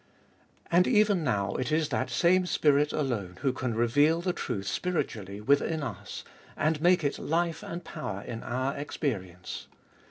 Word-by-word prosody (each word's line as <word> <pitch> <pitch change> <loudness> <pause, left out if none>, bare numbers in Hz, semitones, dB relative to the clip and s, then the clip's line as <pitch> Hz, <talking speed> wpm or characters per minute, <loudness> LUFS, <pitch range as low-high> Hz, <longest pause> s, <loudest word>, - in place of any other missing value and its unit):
And 175 +2 +5
even 210 -6 +4
now 105 -7 0
it 130 +4 -2
is 155 -1 +2
that - - -1
same 180 +1 +3
spirit 150 -2 +3
alone 110 -11 -2
who 135 -2 +2
can 125 -3 -2
reveal 145 +8 +3
the 180 +1 -1
truth 105 - -3
spiritually 105 - -2
within 140 +7 +2
us, - - -6 0.3
and 155 0 +1
make 175 0 +4
it 145 - -1
life 165 0 0
and 170 +1 -6
power 110 -12 -5
in 115 -1 -6
our 130 +3 -2
experience. 100 - -4
145 Hz, 155 wpm, -29 LUFS, 115-165 Hz, 0.3 s, And